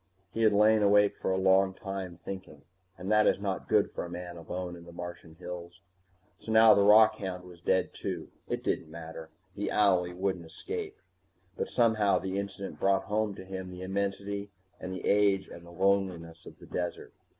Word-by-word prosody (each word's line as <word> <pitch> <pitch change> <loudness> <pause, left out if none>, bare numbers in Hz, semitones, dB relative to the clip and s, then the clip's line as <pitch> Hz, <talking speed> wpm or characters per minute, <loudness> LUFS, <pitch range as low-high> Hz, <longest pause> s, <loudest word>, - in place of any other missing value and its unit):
He 115 - -2
had 110 -1 +5
lain 105 +1 +5
awake 105 0 +4
for - - -3
a 95 - +1
long 95 0 +3
time, 95 -3 -6
thinking, 95 -1 -8 0.3
and 95 +4 -4
that 105 0 +5
is - - +3
not 100 -2 -3
good - - +3
for - - -4
a 85 - -7
man 90 0 -7
alone 90 +1 -5
in 85 -1 -12
the 85 - -11
Martian 85 -2 -8
hills. 90 0 -8 0.6
So 110 - -6
now 110 0 +8
the 100 - +4
rockhound 105 -3 +4
was 90 -1 -14
dead 95 +1 +1
too. - - -5 0.2
It - - -2
didn't 80 - -1
matter, 80 0 -9 0.3
the 105 - -2
owlie 90 -4 +2
wouldn't 95 -2 -2
escape. - - -6 0.6
But - - -3
somehow 110 -4 +3
the 95 +1 -2
incident 100 0 -6
brought 95 0 +2
home 105 0 -1
to 95 - -10
him 95 -1 -6
the 90 0 -8
immensity 100 +1 -3 0.3
and 95 - -6
the 95 -2 -5
age 100 -2 +3
and 85 - -11
the 85 - -13
loneliness 90 -3 0
of - - -12
the - - -14
desert. - - -4
95 Hz, 190 wpm, -30 LUFS, 90-100 Hz, 0.6 s, now